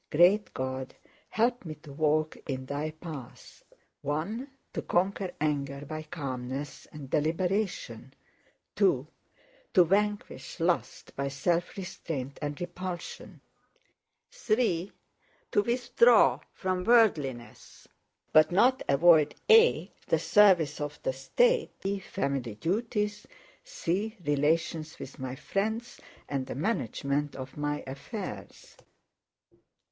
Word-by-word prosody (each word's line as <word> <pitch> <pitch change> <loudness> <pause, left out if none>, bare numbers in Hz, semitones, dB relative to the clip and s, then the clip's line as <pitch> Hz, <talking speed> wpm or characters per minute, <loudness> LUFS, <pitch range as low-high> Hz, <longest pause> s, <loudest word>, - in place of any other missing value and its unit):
Great 180 +7 +4
God, 130 0 -4 0.3
help 240 +2 +1
me 155 -3 -6
to 150 -1 -13
walk 155 +1 +1
in 130 -2 -3
Thy 145 +3 -3
paths, 150 -6 -10 0.4
(1) 190 - -3 0.2
to - - -2
conquer 190 +1 0
anger 140 -2 -1
by 155 +2 -5
calmness 135 -3 -5
and 150 -3 -9
deliberation, 180 +8 -1 0.7
(2) - - +3 0.7
to 180 - +8
vanquish 205 +2 -1
lust 170 +1 -1
by 140 0 -2
self 165 +7 -1
restraint 145 -7 -5
and 145 -1 -3
repulsion, 175 0 -6 0.9
(3) 215 - 0 0.6
to - - +4
withdraw 235 - +4
from 185 -1 -2
worldliness, 160 - +1 0.5
but 155 +1 +6
not 245 +8 +4
avoid 150 +1 +5 0.2
(a) 455 +2 +6 0.2
the - - +3
service 180 -9 +4
of 145 0 -4
the 130 - 0
state, 485 - +1
(b) 195 +1 -2
family 140 - -3
duties, 210 - -2 0.4
(c) 220 - -2
relations 155 +2 0
with - - -9
my 130 0 -4
friends, 220 - -3 0.3
and 135 -2 -2
the - - -5
management 145 - -1
of 130 0 -8
my 145 0 -2
affairs. 200 - -8
160 Hz, 110 wpm, -29 LUFS, 140-205 Hz, 0.9 s, to